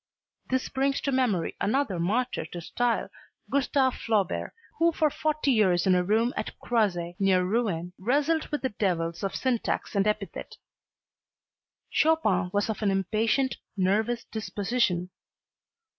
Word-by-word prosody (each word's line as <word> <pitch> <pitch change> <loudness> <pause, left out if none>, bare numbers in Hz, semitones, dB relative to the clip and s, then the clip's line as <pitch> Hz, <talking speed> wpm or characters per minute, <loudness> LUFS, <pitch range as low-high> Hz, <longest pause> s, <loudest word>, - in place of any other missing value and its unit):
This 260 0 0
brings 275 +1 0
to 280 - -1
memory 245 -10 +1
another 215 -4 0
martyr 230 +9 0
to 175 - -7
style, 235 +7 -1 0.4
Gustave 270 -1 +2
Flaubert, 205 -5 -1 0.3
who 335 0 +4
for 310 -2 +1
forty 305 -2 0
years 190 -7 +3
in 190 - +4
a 180 0 +3
room 225 +6 +2
at - - -4
Croisset, 185 -8 0
near 190 -2 +3
Rouen, 180 -4 -1
wrestled 290 - +1
with 295 -2 -3
the 260 - +1
devils 170 -5 -1
of 195 - -2
syntax 245 -4 -1
and 200 +1 +2
epithet. 210 -3 -3 1.3
Chopin 305 - +2
was 205 +1 +1
of 220 -2 -3
an 210 - +2
impatient, 220 +7 +1 0.2
nervous 215 +5 +1
disposition. 205 -4 -1
215 Hz, 135 wpm, -27 LUFS, 190-260 Hz, 1.3 s, who